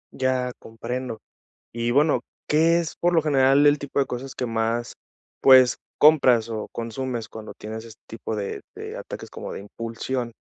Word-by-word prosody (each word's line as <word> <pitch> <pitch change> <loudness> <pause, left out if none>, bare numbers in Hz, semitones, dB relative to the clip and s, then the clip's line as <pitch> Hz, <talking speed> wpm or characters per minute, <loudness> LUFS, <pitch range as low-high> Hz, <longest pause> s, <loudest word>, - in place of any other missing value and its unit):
Ya 130 -1 0
comprendo. 115 +1 -5 0.5
Y 120 0 -1
bueno, 145 +3 +3 0.3
¿qué 165 +3 +4
es 165 - -4
por 175 0 +2
lo 165 - +4
general 140 -1 +4
el 145 0 +5
tipo 140 0 -3
de 135 - +2
cosas 130 +2 -5
que 125 - -3
más 115 +1 -1 0.5
pues 130 -2 +7 0.2
compras, 130 -7 +5
o 110 -2 -4
consumes 115 0 -4
cuando 110 -1 -9
tienes 110 +1 -7
este 110 -1 -14
tipo 110 -1 -5
de 100 -2 -4
de - - -7
ataques - - -8
como - - -7
de - - -6
impulsión? 115 +4 -4
125 Hz, 165 wpm, -24 LUFS, 115-135 Hz, 0.5 s, pues